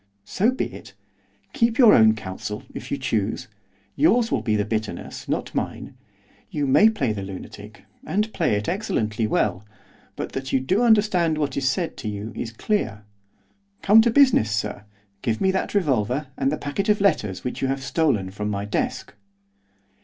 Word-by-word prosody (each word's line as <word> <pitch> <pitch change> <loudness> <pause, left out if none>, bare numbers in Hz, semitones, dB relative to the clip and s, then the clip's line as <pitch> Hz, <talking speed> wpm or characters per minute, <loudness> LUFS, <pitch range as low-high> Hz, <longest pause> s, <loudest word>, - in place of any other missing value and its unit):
'So 205 - +1
be 260 - -1
it. - - -12 0.6
Keep 230 -5 +1
your 240 -5 +8
own 110 0 +6
counsel, 105 +1 -6
if - - -8
you - - -1
choose. 110 -6 -2 0.5
Yours 230 +1 +3
will 120 - +1
be 110 -2 0
the 105 -1 0
bitterness, 110 -1 -5
not - - -2
mine. - - -4 0.6
You 145 -1 -2
may 175 +11 +6
play 135 - -1
the 100 - -5
lunatic, 100 +2 -9 0.2
and 215 -2 -1
play 160 - +1
it 105 0 -3
excellently 115 - -1
well, 95 -2 0 0.5
but - - -5
that 135 0 -5
you 135 - +3
do 185 - +1
understand 205 -8 +3
what 145 -3 -1
is 135 -1 +1
said 170 +4 -2
to 110 - -4
you 105 +2 -6
is 115 - -4
clear. 115 - -2 0.8
Come 215 +3 +7
to 235 - +3
business, 255 - +4
sir. 105 -1 -3 0.4
Give 115 -4 -1
me 190 - +2
that 190 +2 -2
revolver, 135 - 0
and 135 -1 0
the 155 - -1
packet 195 +9 -3
of 210 - +3
letters 110 - +1
which 125 - -4
you 135 - +1
have 135 0 -2
stolen 125 -8 0
from 105 +1 -4
my 100 -1 -3
desk. 105 - -3
135 Hz, 175 wpm, -23 LUFS, -, 0.8 s, your